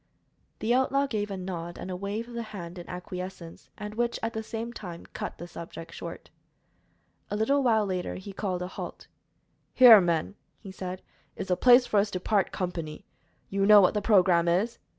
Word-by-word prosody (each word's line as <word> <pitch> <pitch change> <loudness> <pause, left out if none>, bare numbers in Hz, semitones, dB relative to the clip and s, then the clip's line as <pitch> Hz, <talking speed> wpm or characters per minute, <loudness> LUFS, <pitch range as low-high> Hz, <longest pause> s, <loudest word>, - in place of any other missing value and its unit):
The 225 +2 0
outlaw 270 +2 +2
gave 210 -6 -2
a 195 - -4
nod 175 -2 -6
and 185 - -6
a - - -3
wave 200 +5 -4
of 240 - -11
the 235 - -3
hand 185 -6 -8
in 175 - -10
acquiescence, 180 -1 -8
and 210 -1 -6
which, 235 +2 -1
at 225 - -2
the 220 - -3
same 225 +2 -5
time, 175 -7 -8
cut - - -5
the 175 - -7
subject 165 -1 -9
short. - - -8 1.0
A - - -2
little 275 +7 +2
later 210 -7 +1
he 195 +1 -8
called 185 -3 -3
a - - -4
halt. 185 - -8 0.7
"Here, 235 -5 +10
men," 170 +1 0 0.3
he 195 - -10
said, 185 -1 -6 0.3
"is - - -6
the 180 - +3
place 245 +4 +6
for 210 - +2
us 205 +1 +1
to 185 - -3
part 200 +1 +1
company. 165 -4 -5 0.5
You 195 0 +1
know 210 -1 +9
what 185 - +4
the 210 - 0
programme 180 -5 +4
is." 195 +8 +1
195 Hz, 190 wpm, -28 LUFS, 180-220 Hz, 1.0 s, Here